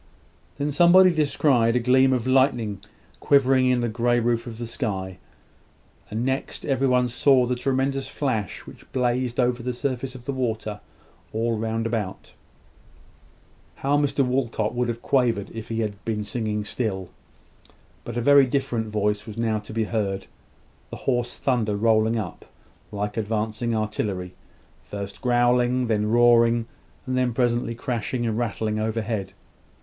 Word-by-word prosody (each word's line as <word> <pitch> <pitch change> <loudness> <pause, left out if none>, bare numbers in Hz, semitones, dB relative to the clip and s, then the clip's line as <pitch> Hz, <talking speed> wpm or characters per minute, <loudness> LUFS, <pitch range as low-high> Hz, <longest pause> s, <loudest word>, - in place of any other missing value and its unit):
Then 145 +1 -1
somebody 180 +4 +6
descried 140 -7 +2
a - - +4
gleam 130 +2 +4
of 125 -3 0
lightning 125 -6 +2 0.4
quivering 130 -2 +4
in 125 -1 +2
the 120 - 0
grey 120 +2 +1
roof 120 +1 0
of 115 -2 -7
the 120 - -4
sky; 95 -6 -4 0.9
and 110 +3 -2
next, 135 +1 -2
every 135 -1 +1
one 125 -1 +3
saw 125 +1 +3
the 125 - -1
tremendous 135 +2 -1
flash 115 - -2
which - - -14
blazed 125 -1 0
over 125 -1 +1
the 125 +1 -3
surface 130 0 -3
of 125 -1 -11
the - - -2
water, 110 -5 -3 0.5
all 115 +1 0
round 115 +1 -2
about. 110 -5 -4 1.5
How 140 +1 +3
Mr 145 -1 +2
Walcot 120 -4 -1
would 125 0 0
have 120 0 -4
quavered 120 -7 +1
if 115 -1 -8
he 115 0 -1
had 100 -2 -4
been 110 -2 -2
singing 105 -1 -3
still. 95 -6 -3 0.9
But 120 0 -6
a - - 0
very 140 +1 +6
different 125 -4 -1
voice 105 0 -1
was 110 - -8
now 110 -2 0
to 105 - -11
be 110 0 0
heard 100 -3 -2 0.6
the - - -7
hoarse 120 -2 0
thunder 115 -6 0
rolling 110 +1 +2
up, 100 -7 -6 0.5
like 105 +1 -3
advancing 110 +2 -1
artillery; 105 -4 -2 0.5
first 100 -1 -7
growling, 125 0 +2
then 105 -2 0
roaring, 120 0 +4 0.4
and 130 -2 0
presently 120 -1 0
crashing 120 +1 -2
and 110 -2 -1
rattling 110 -2 -1
overhead. 110 -3 -2
120 Hz, 150 wpm, -24 LUFS, 110-125 Hz, 1.5 s, somebody